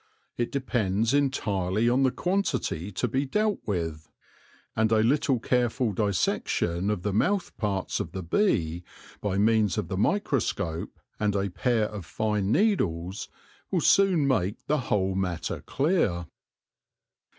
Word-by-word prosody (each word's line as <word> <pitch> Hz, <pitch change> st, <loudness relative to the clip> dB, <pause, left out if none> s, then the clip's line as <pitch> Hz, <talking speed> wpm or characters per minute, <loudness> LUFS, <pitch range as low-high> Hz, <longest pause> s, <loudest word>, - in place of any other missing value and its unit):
It 120 Hz, -1 st, -2 dB
depends 115 Hz, -4 st, 0 dB
entirely 110 Hz, -7 st, +1 dB
on 125 Hz, +3 st, +3 dB
the 135 Hz, -, +4 dB
quantity 145 Hz, -, -1 dB
to 115 Hz, +6 st, -1 dB
be 130 Hz, +4 st, 0 dB
dealt 210 Hz, +8 st, 0 dB
with; 80 Hz, -6 st, -3 dB, 0.7 s
and 110 Hz, 0 st, +2 dB
a 110 Hz, -1 st, +4 dB
little 135 Hz, +1 st, +2 dB
careful 125 Hz, -1 st, +1 dB
dissection 95 Hz, -2 st, 0 dB
of 105 Hz, -4 st, -2 dB
the 105 Hz, -, -1 dB
mouth 185 Hz, -, +1 dB
parts 100 Hz, -4 st, -1 dB
of -, -, -4 dB
the 95 Hz, -, -5 dB
bee, 85 Hz, -, +1 dB, 0.4 s
by 100 Hz, -2 st, -1 dB
means 110 Hz, 0 st, +3 dB
of 100 Hz, -6 st, -2 dB
the 95 Hz, -, -2 dB
microscope 100 Hz, -, -1 dB, 0.2 s
and 105 Hz, -1 st, +1 dB
a 100 Hz, -1 st, 0 dB
pair 115 Hz, +3 st, +1 dB
of 105 Hz, -5 st, -7 dB
fine 105 Hz, -2 st, -1 dB
needles, 95 Hz, -, 0 dB, 0.4 s
will -, -, +1 dB
soon 185 Hz, -7 st, +4 dB
make 105 Hz, -6 st, 0 dB
the 150 Hz, +1 st, +1 dB
whole 95 Hz, -2 st, +1 dB
matter 90 Hz, -3 st, -2 dB
clear. 135 Hz, -, +1 dB
105 Hz, 140 wpm, -27 LUFS, 95-135 Hz, 0.7 s, the